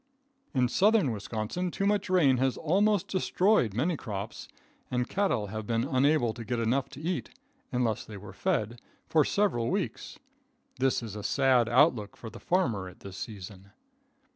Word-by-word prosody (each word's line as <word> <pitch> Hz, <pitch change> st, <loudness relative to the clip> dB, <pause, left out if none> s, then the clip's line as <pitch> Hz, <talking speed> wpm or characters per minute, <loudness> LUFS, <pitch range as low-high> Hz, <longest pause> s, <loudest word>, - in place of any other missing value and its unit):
In 125 Hz, -1 st, +3 dB
Southern 200 Hz, -, +3 dB
Wisconsin 110 Hz, -, -3 dB
too 195 Hz, -, -2 dB
much 205 Hz, -1 st, +1 dB
rain 155 Hz, -9 st, +4 dB
has 130 Hz, 0 st, +1 dB
almost 200 Hz, +4 st, +2 dB
destroyed 185 Hz, -, +2 dB
many 160 Hz, +9 st, +1 dB
crops, 105 Hz, -6 st, -6 dB, 0.4 s
and 125 Hz, 0 st, -1 dB
cattle 195 Hz, -, 0 dB
have 110 Hz, -1 st, -5 dB
been 115 Hz, 0 st, +1 dB
unable 135 Hz, -2 st, +2 dB
to 115 Hz, -, -7 dB
get 120 Hz, +2 st, -2 dB
enough 130 Hz, +4 st, 0 dB
to 140 Hz, -, -11 dB
eat, 155 Hz, -7 st, -3 dB, 0.4 s
unless 120 Hz, -3 st, 0 dB
they 105 Hz, -, -9 dB
were 100 Hz, 0 st, -10 dB
fed, 120 Hz, -, -1 dB, 0.2 s
for 155 Hz, -2 st, +3 dB
several 180 Hz, -, +1 dB
weeks. 195 Hz, 0 st, -3 dB, 0.6 s
This 130 Hz, -2 st, +1 dB
is 110 Hz, -3 st, -6 dB
a 105 Hz, -, -5 dB
sad 125 Hz, +1 st, +3 dB
outlook 120 Hz, -5 st, +3 dB
for 115 Hz, -, -8 dB
the -, -, -10 dB
farmer 120 Hz, -, 0 dB
at 90 Hz, -, -17 dB
this 95 Hz, -1 st, -9 dB
season. 100 Hz, -1 st, -9 dB
125 Hz, 165 wpm, -29 LUFS, 110-170 Hz, 0.6 s, rain